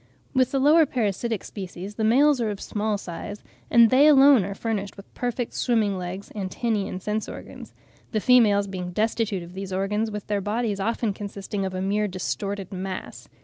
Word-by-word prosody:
With 260 -2 +3
the 275 - -1
lower 305 +3 +5
parasitic 225 -3 -1
species 190 0 -7
the 220 - -3
males 265 +4 +4
are 225 - 0
of 205 -2 -4
small 210 0 -2
size, 200 +2 -7 0.3
and 235 -2 +6
they 275 +4 +6
alone 275 -5 +7
are 195 +1 -5
furnished 205 -3 -3
with 195 - -14
perfect 245 -1 -3
swimming 220 -5 +1
legs, 185 +2 -6
antennae 205 +1 -2
and 185 - -5
sense 210 +3 -3
organs; - - -10 0.4
the 215 - +1
females 215 -4 +5
being 180 -2 -6
destitute 215 -2 0
of 170 +1 -12
these 190 0 -6
organs, 205 +4 -1
with 210 -1 -6
their 205 -1 -1
bodies 210 0 -1
often 225 +1 -1
consisting 200 0 -5
of 190 -1 -4
a 185 - -2
mere 210 +2 +1
distorted 195 +1 -4
mass. 185 0 -6
210 Hz, 185 wpm, -25 LUFS, 195-230 Hz, 0.4 s, alone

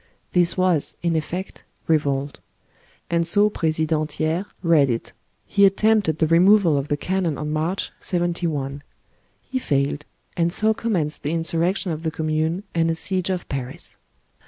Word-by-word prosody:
This 175 0 +3
was, 185 -5 +2
in 170 -1 +1
effect, 175 +4 -4 0.2
revolt; 145 -3 0 0.7
and 170 -1 +1
so 205 +4 +5
President 155 -2 -1
Thiers 160 +6 -1 0.2
read 160 -5 +4
it: 115 -1 -3 0.3
He 200 - +2
attempted 200 -4 +3
the 160 - +2
removal 175 +1 +5
of 140 0 -1
the 145 - -1
cannon 180 -2 -1
on 150 0 -4
March, 160 +5 -2
'71. 165 -6 -2 0.6
He 260 - -3
failed; 145 - -1 0.3
and 170 -1 +1
so 215 +4 +2
commenced 185 -10 -2
the 150 +2 -2
insurrection 170 +3 +1
of 155 -1 -4
the 160 - -1
Commune 160 +3 -1
and 165 -1 +1
a 165 - 0
siege 185 +2 -1
of 185 -2 -3
Paris. 135 +5 -6
165 Hz, 150 wpm, -22 LUFS, 155-185 Hz, 0.7 s, so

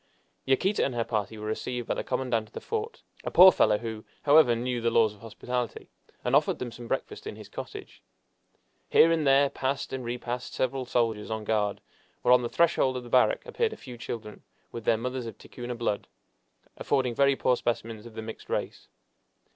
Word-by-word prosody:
Yaquita 185 +10 +2
and 130 - -1
her 115 - +1
party 110 -1 -3
were 105 - -7
received 120 +2 -3
by - - +1
the - - -3
commandant 125 -4 -1
of - - -35
the - - -5
fort, 445 +1 -4 0.2
a - - -2
poor 185 +2 +9
fellow 105 -10 +3
who, 110 -1 -6 0.2
however, 145 -5 +6
knew 120 +1 -2
the 115 - +2
laws 115 -2 +3
of 105 - -19
hospitality, 120 +1 -4 0.3
and - - +2
offered - - +3
them 125 -2 -5
some 120 0 -9
breakfast - - -4
in - - -5
his - - -11
cottage. - - -9 0.9
Here 165 - +6
and 160 -3 +1
there 135 +1 +5
passed 135 +1 -2
and 130 -1 -3
repassed 120 +1 -4
several 130 0 -1
soldiers 115 -4 0
on 110 -1 -3
guard, 105 -1 0 0.4
while 125 - +6
on 125 - +6
the 120 - -3
threshold 145 -6 +2
of 125 - -6
the 120 - -11
barrack 125 +1 +3
appeared 460 -2 -1
a - - -10
few 125 -2 -10
children, 115 -2 -7 0.3
with 115 -2 -7
their 115 - +3
mothers 125 +1 -4
of 115 - -8
Ticuna 120 0 -7
blood, 115 -3 -2 0.7
affording 130 -3 0
very 140 +2 +3
poor 125 - +2
specimens 115 -2 -3
of 115 - -14
the 110 - -5
mixed 110 0 -9
race. - - -3
120 Hz, 200 wpm, -28 LUFS, 115-130 Hz, 0.9 s, poor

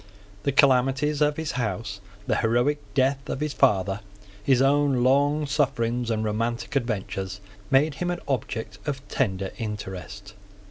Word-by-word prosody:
The 140 - 0
calamities 135 +2 +3
of 150 0 +3
his 160 -2 -2
house, 110 -4 -3 0.2
the - - +1
heroic 120 +6 +2 0.2
death 135 0 +1
of - - -2
his 150 -1 -2
father, 100 -4 +2 0.4
his 130 +1 +4
own 135 -2 +3
long 145 +3 +3
sufferings 125 -4 0
and 110 -1 0
romantic 115 +5 -2
adventures, 95 -6 -2 0.3
made 145 +3 +4
him 175 +4 -3
an 175 0 -2
object 110 -5 -3
of 135 -1 -3
tender 95 -6 -1
interest. 105 -1 -6
125 Hz, 140 wpm, -25 LUFS, 110-140 Hz, 0.4 s, his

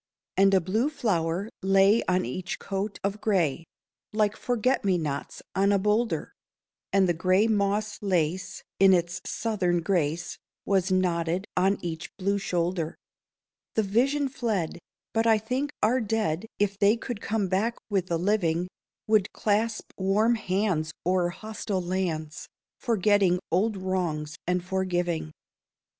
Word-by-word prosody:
And 195 0 +5
a - - +6
blue 215 - 0
flower 195 - -1
lay 195 +3 +4
on 185 0 +2
each 185 - -4
coat 200 +1 -3
of 200 +2 -2
gray, 170 -7 +1 0.5
Like 210 -1 +2
forget 245 +2 0
me 190 -3 +2
nots 150 -4 -4
on 195 +1 +3
a 200 - +4
boulder; 210 +4 0 0.6
And 195 -1 +4
the 175 - +2
gray 185 +5 +3
moss 210 0 0
lace 185 -3 -1 0.2
in 195 0 +7
its 175 -1 0
Southern 180 -6 0
grace 165 -1 -1 0.3
Was 190 -1 +1
knotted 180 0 +1
on 190 +2 +3
each 165 -1 -6
blue 200 +1 0
shoulder. 170 -3 -1 0.8
The 220 - +3
vision 270 +8 +2
fled; 220 - -2 0.3
but 225 +1 +2
I 220 -1 +6
think 255 +7 -2
our 245 +4 +3
dead, 215 -4 -1
If 200 -1 0
they 205 +3 +4
could 235 -2 -6
come 210 -3 0
back 205 +6 0
with 195 -4 0
the 170 - 0
living, 180 -2 +1 0.4
Would 215 -3 +2
clasp 220 +2 -1
warm 205 +5 +3
hands 185 -7 0
o'er 180 -1 +2
hostile 210 0 -4
lands, 175 -3 -3 0.3
Forgetting 205 -5 +3
old 200 +4 +1
wrongs 170 -5 -2
and 180 0 0
forgiving. 175 -4 -1
195 Hz, 140 wpm, -27 LUFS, 175-215 Hz, 0.8 s, in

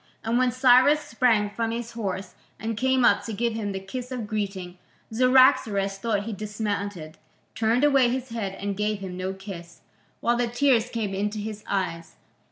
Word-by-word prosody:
And 230 +2 +1
when 255 -1 +3
Cyrus 255 +4 +5
sprang 230 -6 +1
from 230 +1 -2
his 230 0 -4
horse 195 -5 -4 0.3
and 225 0 -3
came 260 +1 +2
up - - +4
to 225 - -4
give 235 +2 -1
him 215 -2 -3
the 190 - -4
kiss 245 +7 -7
of 245 -4 -4
greeting, 195 -4 -4 0.3
Cyaxares, 225 -5 +4
though 215 -1 0
he 215 +2 -5
dismounted, 205 -5 -4 0.3
turned 230 +4 +1
away 275 -4 +5
his 260 +1 -3
head 210 -4 -4
and 200 0 -4
gave 210 +1 -1
him 190 -2 -7
no 185 +1 -3
kiss, 190 -3 -10 0.4
while 240 0 +1
the 245 0 +1
tears 245 -1 +2
came 220 -5 -3
into 205 +2 -2
his 210 0 -6
eyes. 170 -4 -3
220 Hz, 175 wpm, -25 LUFS, 195-245 Hz, 0.4 s, Cyrus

